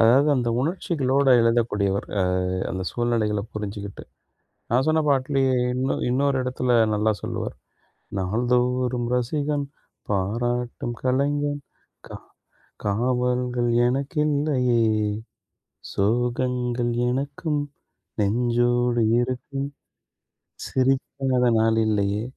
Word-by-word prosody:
அதாவது, 125 +6 +5
அந்த 120 -2 0
உணர்ச்சிகளோட 140 -4 0
எழுதக்கூடியவர். 115 -4 +1
ஆ, - - +3 0.5
அந்த 95 0 -3
சூழ்நிலைகள 115 -3 0
புரிஞ்சுக்கிட்டு. 100 -1 -6 0.7
நான் 125 +3 +3
சொன்ன 160 0 +3
பாட்டுலயே 135 -1 +2 0.2
இன்னொ 130 +1 0 0.2
இன்னொரு 140 +2 +2
இடத்துல 125 0 -1 0.2
நல்லா 105 +1 +2
சொல்லுவார். - - -4 0.6
நாள்தோறும் 125 +4 0
ரசிகன், 145 +3 -1 0.4
பாராட்டும் 120 +5 -1
கலைஞன் 145 +3 0 0.5
கா - - -7 0.7
காவல்கள் 125 +2 0 0.2
எனக்கில்லையே. 140 -2 +1 1.1
சோகங்கள் 120 +2 0 0.2
எனக்கும், 145 +4 -2 0.6
நெஞ்சோடு 120 +3 +2 0.2
இருக்கும். 135 +3 -3 1.0
சிரிக்காத 130 -1 +1
நாளில்லையே. 110 -2 +1
125 Hz, 80 wpm, -24 LUFS, 115-135 Hz, 1.1 s, அதாவது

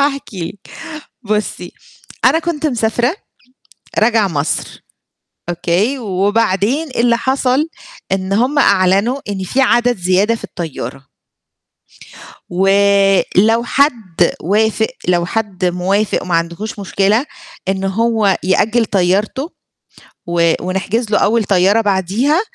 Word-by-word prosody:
هاحكِ 275 -4 -1
لِك، 185 +2 -7 0.5
بُصّي، 215 0 -3 0.5
أنا 325 - +5
كنت 330 -2 -2
مسافرة 240 - 0 0.8
راجعة 220 -2 +3
مصر، 150 -4 -3 0.7
أوكي؟ 175 +9 0
وبعدين 205 - 0
إيه 255 - -3
اللي 235 0 +3
حصل، 265 +4 0 0.4
إن 190 0 -1
هُم 250 +8 +1
أعلنوا 200 +4 +3
إن 195 -2 -3
في 255 +9 -1
عدد 245 -2 +3
زيادة 185 +4 +2
في 230 - -8
الطيارة. 135 -6 -7 1.4
ولو 200 +3 +3
حد 230 - +1
وافق، 220 +4 +1 0.2
لو 175 -1 +2
حد 195 -2 -2
موافق، 190 +4 0
وما 180 -2 -1
عندهوش 170 +6 -3
مشكلة، 200 +5 +1 0.4
إنه 190 0 -1
هو 215 -1 +1
يأجل 220 +6 +2
طيارته، 205 - 0 0.8
و 170 -1 +2
ونحجز 195 +5 -2
له - - +3
أول 225 +2 +2
طيارة 195 +3 +3
بعديها، 210 - +1
205 Hz, 110 wpm, -16 LUFS, 185-235 Hz, 1.4 s, أنا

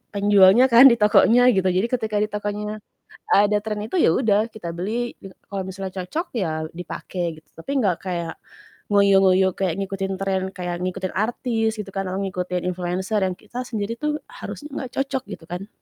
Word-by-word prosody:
penjualnya 205 +5 +5
kan, 240 +3 +10
di 240 - +6
tokonya 235 +3 +5
gitu, 190 -4 +1
jadi 185 +4 +1
ketika 220 -4 -1
di - - 0
tokonya 210 +1 -4 0.5
ada 205 +1 +5
trend 210 0 -4
itu, - - -3
ya 335 - +4
udah 210 -1 +3
kita 205 -6 -7
beli, 230 +7 -3
gitu. 195 - -12 0.2
Kalau 195 -1 -3
misalnya 190 0 -6
cocok 320 - -3
ya 185 -8 0 0.2
dipake 175 -1 -5
gitu, 155 - -41
tapi 165 +12 -9
gak 190 -7 +2
kayak 170 -3 -3 0.6
ngoyo-ngoyo 195 -2 +5
kayak 185 -4 0
ngikutin 195 0 -3
trend 190 -1 0
kayak 175 -1 -3
ngikutin 185 0 -3
artis 225 +1 0
gitu 205 -2 -7
kan, 195 0 -2
atau 190 - -2
ngikutin 180 -2 -3
influencer 180 +4 -2
yang 185 - 0
kita 240 +4 -7
sendiri 225 -2 -4
tuh 300 +4 -2
harusnya 295 - -8 0.2
gak - - -37
cocok 270 -1 -1
gitu 170 - -9
kan. 180 +4 -6
200 Hz, 180 wpm, -23 LUFS, 185-225 Hz, 0.6 s, kan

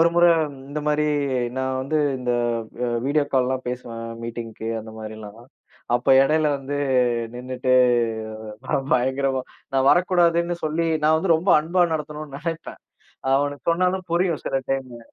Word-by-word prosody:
ஒரு 165 - +6
முறை 175 0 +6 0.4
இந்த 150 +1 -4
மாரி 150 0 +2 0.5
நான் 130 0 -1
வந்து 150 +4 0 0.2
இந்த 125 -1 -1 0.5
வ - - 0 0.2
வீடியோ 145 +1 +2
கால்லாம் 130 0 +1
பேசுவேன் 115 -2 -6
மீட்டிங்க்கு 115 -1 -6
அந்த 110 0 -10
மாரிலாம். 110 0 -9 0.5
அப்ப 120 - -1 0.2
இடையில 155 +2 +2
வந்து 140 +1 -4 0.6
நின்னுட்டு 130 +1 -2 0.9
நான் 135 0 -1
பயங்கரமா 130 +1 +1 0.3
நான் 135 0 +3
வரக்கூடாதுன்னு 175 -1 +3
சொல்லி 165 +2 0 0.2
நான் 155 +1 +5
வந்து 165 0 +2
ரொம்ப 180 +4 -1
அன்பா 175 +3 +2
நடத்தணுனு 150 -2 -5
நெனைப்பேன். 165 +1 -6 0.5
அவனுக்கு 145 +2 -1
சொன்னாலும் 185 +2 +1
புரியும் 170 -2 +1
சில - - -1 0.2
டைமு. 130 -3 -3
140 Hz, 135 wpm, -23 LUFS, 125-165 Hz, 0.9 s, ஒரு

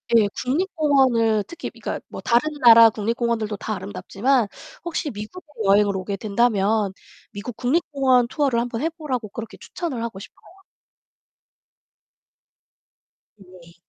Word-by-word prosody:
예, 215 -3 +5 0.2
국립공원을 265 - +2
특히 340 - -7
그러니까 - - -5
뭐 - - -8
다른 245 +6 +2
나라 230 -1 +9
국립공원들도 225 -1 -2
다 215 - -4
아름답지만 205 +5 -1 0.4
혹시 325 -3 -3
미국에 215 - -9 0.2
여행을 200 0 +3
오게 195 +2 -4
된다면 210 -1 +1 0.4
미국 215 +3 -7
국립공원 260 -3 +2
투어를 265 -3 0
1 245 +1 -2
번 230 +2 -4
해 325 - +1
보라고 265 - -5
그렇게 225 +2 -8
추천을 270 -10 -5
하고 225 -5 -5
싶어요. - - -14 2.9
네. 180 -3 -17
230 Hz, 295 characters per minute, -22 LUFS, 210-270 Hz, 2.9 s, 나라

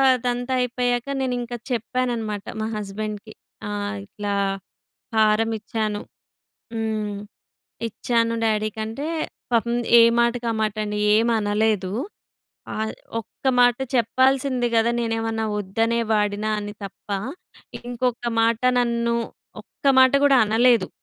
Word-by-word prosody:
అదంతా 245 +1 -2
అయిపోయాక, 245 0 0 0.2
నేను 255 -1 0
ఇంకా 240 0 -5
చెప్పాననమాట, 230 -3 -2 0.2
మా 220 - -1
హస్బెండ్‍కి. 210 +1 -5 0.3
ఆహ్, 205 0 -3
ఇట్లా 205 0 -4 0.8
హారం 220 +1 +3
ఇచ్చాను. 215 -1 -2 0.7
హ్మ్. 215 -2 -2 0.7
ఇచ్చాను, 230 +1 0
డ్యాడీకి 215 0 0
అంటే 275 +7 -5 0.5
పాపం 235 +1 +2 0.2
ఏ - - +9 0.2
మాటకి 235 0 +1
ఆ - - -3
మాటండి. 210 0 -2 0.2
ఏం 225 +2 +3
అనలేదు. 205 -2 +1 0.8
ఆహ్, 220 0 -2 0.3
"ఒక్క 225 - -22 0.2
మాట 245 -1 +5 0.2
చెప్పాల్సింది 255 +2 +2
గదా! 225 +1 +4
నేనేమన్నా 225 -1 -1
వద్దనే 225 +4 0
వాడినా" 210 0 +1
అని 205 0 -6
తప్ప, 195 - -11 0.7
ఇంకొక 245 0 -2
మాట 230 0 +2 0.2
నన్ను, 235 -1 +1 0.5
ఒక్క - - -10
మాట 260 0 +6
గూడా 275 -2 +6
అనలేదు. 230 -2 +4
225 Hz, 110 wpm, -23 LUFS, 215-240 Hz, 0.8 s, ఏ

